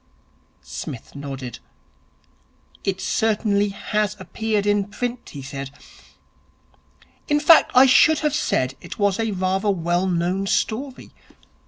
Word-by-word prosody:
Psmith 120 - -8
nodded. 135 -4 -7 1.2
'It 190 -1 -1
certainly 205 0 +1
has 210 +1 -2
appeared 215 -2 -2
in 205 -1 +2
print,' 245 +4 -5
he 140 -2 -9
said. 135 0 -6 1.6
'In 295 0 +2
fact 315 +2 +6
I 255 +2 +8
should 300 +4 +6
have 300 -2 0
said 130 - 0
it - - -9
was 205 0 +1
rather 195 -2 -1
a - - +4
well 175 0 0
known 180 +2 -1
story. 255 +7 -2
200 Hz, 120 wpm, -22 LUFS, 175-225 Hz, 1.6 s, I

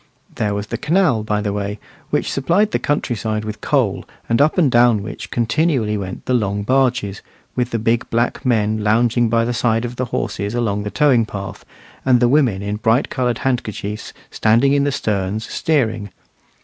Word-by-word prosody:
There 105 -1 -1
was 100 0 -3
the - - -5
canal, 160 - +2
by 105 -1 -1
the 105 -1 -2
way, 100 0 -3 0.3
which - - 0
supplied 175 +10 +1
the - - 0
country 145 -4 -1
side 110 -1 -3
with 105 -1 -6
coal, - - +1 0.2
and 115 +3 +2
up 155 +5 +3
and 155 -8 +4
down 120 -3 +4
which 105 - -7
continually 120 -1 +1
went 95 -3 -6
the 130 - 0
long 100 -4 0
barges, 125 -4 +1 0.3
with 125 -1 0
the 115 - -1
big 115 +1 0
black 120 +3 0
men 110 -4 +1
lounging 115 +2 +2
by 115 0 +2
the 120 - -1
side 115 -1 +1
of 120 +1 -6
the 130 - -1
horses 105 -2 -3
along 105 -4 0
the 105 - -4
towing 125 -4 +3
path, 100 -2 -7 0.4
and 125 -2 +4
the 120 - +4
women 120 -8 +2
in 105 +1 -2
bright 115 +4 +1
coloured 125 -3 0
handkerchiefs 110 -5 -3 0.2
standing 115 +6 +3
in 140 0 +2
the 145 - +1
sterns 105 -2 -2
steering. 115 - 0
115 Hz, 190 wpm, -19 LUFS, 105-125 Hz, 0.4 s, and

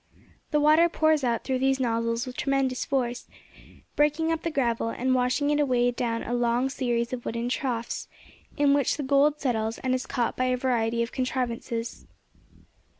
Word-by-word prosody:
The 300 - +2
water 310 +3 +5
pours 315 -3 +2
out 235 -2 0
through 260 -1 -1
these 270 0 +2
nozzles 230 -1 0
with 255 -1 -8
tremendous 270 -2 0
force, 245 -3 -2 0.7
breaking 300 +2 +2
up 325 -1 -1
the 335 - -2
gravel, 235 -6 0
and 255 +3 0
washing 255 +3 +1
it 295 - +1
away 245 -4 +2
down 230 -1 -2
a 240 - -4
long 240 +2 +1
series 240 -3 -1
of 245 -1 -4
wooden 235 +1 -3
troughs, 245 -3 -3 0.5
in 285 -1 +4
which 285 -1 +1
the 295 - -3
gold 285 +2 +3
settles, 225 -5 -1
and 255 -1 -1
is 255 - -2
caught 240 -2 -1
by 255 - 0
a 255 0 +1
variety 235 -3 0
of 235 - -6
contrivances. 240 -2 -3
255 Hz, 175 wpm, -26 LUFS, 235-280 Hz, 0.7 s, water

